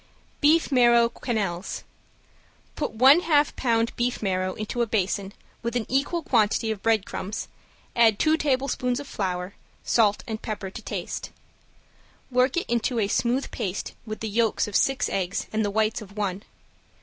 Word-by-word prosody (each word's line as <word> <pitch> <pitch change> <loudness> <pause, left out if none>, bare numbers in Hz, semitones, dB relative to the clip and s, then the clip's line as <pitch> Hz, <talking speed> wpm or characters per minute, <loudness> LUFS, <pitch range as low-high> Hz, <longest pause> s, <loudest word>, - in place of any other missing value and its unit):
~BEEF 310 +2 +4
MARROW 235 -2 +5
QUENELLES~ 205 -7 -3 0.9
Put 300 - -3
one 265 +8 +7
half 300 -4 +2
pound 230 -2 +1
beef 240 -1 -1
marrow 185 -1 -1
into 215 +3 -3
a 235 - +1
basin, 200 -2 -1 0.3
with 235 0 -3
an 235 -3 0
equal 285 +6 0
quantity 220 -3 +2
of 210 -3 -5
breadcrumbs, 215 -2 -1 0.5
add 225 -3 +5
two 310 +6 +3
tablespoons 260 -4 0
of 285 - -8
flour; 185 -4 -3 0.3
salt 210 -3 +2
and 220 -2 -5
pepper 205 -3 -5
to - - -8
taste. - - -5 1.0
Work 255 +4 +2
it 345 - 0
into 235 +1 0
a 210 -3 +2
smooth 245 +6 0
paste 190 0 -4
with 215 -1 -7
the 220 - -2
yolks 225 0 +1
of 210 - -6
six 270 -1 +2
eggs 190 -1 -2
and 220 0 +1
the 205 - 0
whites 220 +2 0
of 205 0 -12
one. 200 -2 -2
225 Hz, 160 wpm, -25 LUFS, 205-250 Hz, 1.0 s, one